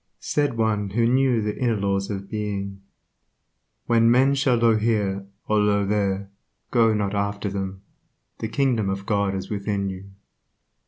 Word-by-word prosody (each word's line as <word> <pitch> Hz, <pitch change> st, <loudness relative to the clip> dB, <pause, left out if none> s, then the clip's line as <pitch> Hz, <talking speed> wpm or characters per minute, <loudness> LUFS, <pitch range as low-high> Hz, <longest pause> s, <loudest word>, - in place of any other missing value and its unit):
Said 145 Hz, -5 st, -1 dB
one 105 Hz, -3 st, 0 dB
who 115 Hz, +4 st, +1 dB
knew 125 Hz, -2 st, +3 dB
the 105 Hz, 0 st, -2 dB
inner 120 Hz, -3 st, +1 dB
laws 100 Hz, -1 st, -1 dB
of 100 Hz, -1 st, -5 dB
Being," 100 Hz, -2 st, -4 dB, 1.0 s
When 115 Hz, -1 st, +4 dB
men 130 Hz, +3 st, +4 dB
shall 135 Hz, -3 st, +2 dB
say 120 Hz, -, +2 dB
Io 115 Hz, -1 st, +5 dB
here, 105 Hz, -3 st, 0 dB, 0.2 s
or 105 Hz, -1 st, +3 dB
Io 100 Hz, -1 st, +2 dB
there, 100 Hz, -1 st, -1 dB, 0.4 s
go 115 Hz, -2 st, +4 dB
not 100 Hz, -1 st, -1 dB
after 100 Hz, 0 st, -2 dB
them; 95 Hz, -1 st, -5 dB, 0.6 s
the 110 Hz, -, -2 dB
kingdom 115 Hz, -4 st, +1 dB
of 95 Hz, 0 st, -3 dB
God 100 Hz, -2 st, 0 dB
is 95 Hz, -, -5 dB
within 100 Hz, -1 st, -2 dB
you." 95 Hz, +1 st, -8 dB
105 Hz, 160 wpm, -24 LUFS, 100-115 Hz, 1.0 s, Io